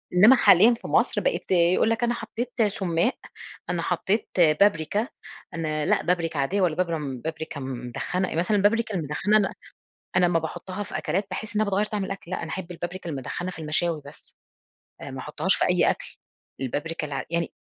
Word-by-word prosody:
إنما 215 +9 +8
حاليًا 220 0 +6
في 235 - -7
مصر - - +2
بقِت - - -1
يقول 180 +3 +4
لك 225 +1 0
أنا 240 0 +2
حطيت 235 +1 -5
سمّاق، 190 +2 0 0.5
أنا 175 -1 -1
حطيت 190 +5 0
بابريكا، 175 +5 +3 0.5
أنا 155 -2 -2
لأ، - - +2
بابريكا 165 -4 0
عادية 185 +9 +1
ولا 175 -4 +2
بابر 170 -2 0 0.3
بابريكا 160 -2 -4
مُدخنّة، 130 +8 -3
مثلًا 180 +6 +2
البابريكا 215 +2 +2
المُدخنّة 170 +6 +1
أنا 200 -2 +1 0.6
أنا 185 -1 +5
امّا 175 -1 +2
باحطها 175 +5 -5
في - - -5
أكلات 195 +2 -1
باحس 215 +4 -5
إن 210 - +3
هي 215 - +1
بتغير 200 +1 +1
طعم 210 -2 -2
الأكل، 195 -2 -7
لأ - - -2
أنا 160 - -6
أحب 185 -1 -5
البابريكا 175 +1 -6
المُدخنّة 155 +5 -4
في 170 - -10
المشاوي 160 +1 0
بس، - - -14 0.7
آآ، - - -7
ما - - -6
أحطهاش - - 0
في - - +1
أي - - +4
أكل، - - -5 0.4
البابريكا 150 +5 -3
الع 140 -2 -4
يعني 170 0 -1
180 Hz, 180 wpm, -25 LUFS, 160-205 Hz, 0.7 s, إنما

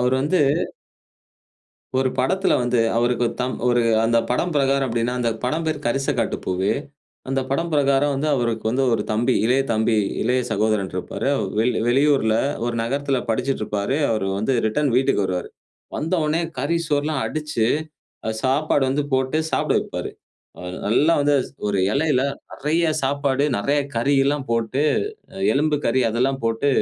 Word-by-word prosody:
அவர் 125 +1 +2
வந்து 150 +7 +1 1.6
ஒரு 130 0 +2
படத்துல 190 +10 +2
வந்து 120 -1 +1 0.2
அவருக்கு 120 +1 +1
ஒரு - - -7
தம் 130 0 -2 0.5
அந்த 115 +1 +3
படம் 170 +8 0
பிரகாரம் 135 -1 +2
எப்படினா, 115 +1 0
அந்த 120 -1 +1
படம் 155 +6 -1
பெயர் 150 -2 -2
கரிச 135 +3 -1
காட்டு - - 0
பூவே. 95 +2 0 0.5
அந்த 135 0 0
படம் 165 +5 -1
பிரகாரம் 140 -1 +2
வந்து 145 +3 -1
அவருக்கு 115 -4 -1
வந்து 130 +3 +1
ஒரு - - -1
தம்பி, 120 +4 +1
இளைய 125 +4 +3
தம்பி, 110 +1 +1 0.3
இளைய 125 +3 +1
சகோதரன் 105 -2 0
இருப்பாரு. 90 - -4
அவர் 95 - -2
வெளி 120 +3 +2
வெளியூர்ல 135 -3 +3 0.3
ஒரு 120 0 -2
நகரத்துல 135 +3 -1
படிச்சிட்டு 125 +3 -1
இருப்பாரு. 105 +5 -1
அவர் 110 -3 0
வந்து 110 +6 0
ரிட்டர்ன் 140 +6 +1
வீட்டுக்கு 130 -6 +2
வருவாரு. 90 -1 -2 0.5
வந்த 160 +4 -3
உடனே 155 +3 +1 0.2
கறி 145 +6 0
சோறுலாம் 145 -1 0
அடிச்சி 150 -8 -1 0.6
அ - - +1
சாப்பாடு 140 +2 +2
வந்து 145 +2 0
போட்டு 130 +3 +1
சாப்பிட - - +1
வைப்பாறு. - - -5 0.8
நல்லா 145 +10 +3
வந்து 145 0 +3 0.3
ஒரு 100 -2 0
இலைல 145 -2 +2 0.3
நிறைய 160 +3 0
சாப்பாடு 140 0 0
நிறைய 140 +8 +1 0.2
கறி 120 +5 +1
எல்லாம் 140 -1 -1
போட்டு, 115 +4 0 0.7
எலும்பு 150 +2 +1
கறி 130 +3 +2
அதெல்லாம் 130 +4 0
போட்டு 115 +5 0
130 Hz, 150 wpm, -22 LUFS, 115-145 Hz, 1.6 s, அந்த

